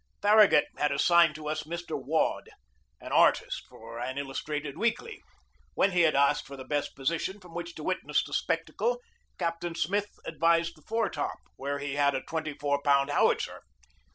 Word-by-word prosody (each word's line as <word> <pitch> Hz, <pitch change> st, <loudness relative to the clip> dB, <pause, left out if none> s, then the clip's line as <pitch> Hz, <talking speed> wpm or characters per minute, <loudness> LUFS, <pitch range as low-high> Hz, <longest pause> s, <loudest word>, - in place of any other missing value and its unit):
Farragut 210 Hz, -5 st, +6 dB
had 150 Hz, -1 st, +1 dB
assigned 170 Hz, +2 st, +4 dB
to 155 Hz, -1 st, -7 dB
us 155 Hz, +1 st, -1 dB
Mr. 170 Hz, +2 st, -6 dB
Waud, -, -, -1 dB, 0.5 s
an -, -, -9 dB
artist -, -, +3 dB
for 115 Hz, +1 st, -10 dB
an 130 Hz, +2 st, -4 dB
illustrated 140 Hz, +1 st, -4 dB
weekly. 235 Hz, -, -2 dB, 0.5 s
When 195 Hz, -, +3 dB
he 180 Hz, -1 st, +3 dB
had 160 Hz, -3 st, +4 dB
asked 140 Hz, 0 st, +3 dB
for 140 Hz, -, -9 dB
the 130 Hz, -, -7 dB
best 145 Hz, +1 st, -2 dB
position 165 Hz, +8 st, -2 dB
from 180 Hz, -3 st, -15 dB
which 170 Hz, 0 st, -6 dB
to 155 Hz, -, -8 dB
witness 185 Hz, +2 st, 0 dB
the -, -, -9 dB
spectacle -, -, -1 dB, 0.4 s
Captain 170 Hz, -1 st, -3 dB
Smith 200 Hz, +6 st, 0 dB, 0.2 s
advised 165 Hz, +1 st, +1 dB
the 155 Hz, -, -20 dB
foretop, 215 Hz, -7 st, -2 dB, 0.2 s
where 140 Hz, +1 st, -3 dB
we 140 Hz, -1 st, -4 dB
had 140 Hz, -1 st, +3 dB
a 130 Hz, -, -1 dB
twenty 160 Hz, -2 st, -4 dB
four 145 Hz, 0 st, -1 dB
pound 140 Hz, 0 st, +3 dB
howitzer. -, -, +1 dB
155 Hz, 170 wpm, -29 LUFS, 140-175 Hz, 0.5 s, Farragut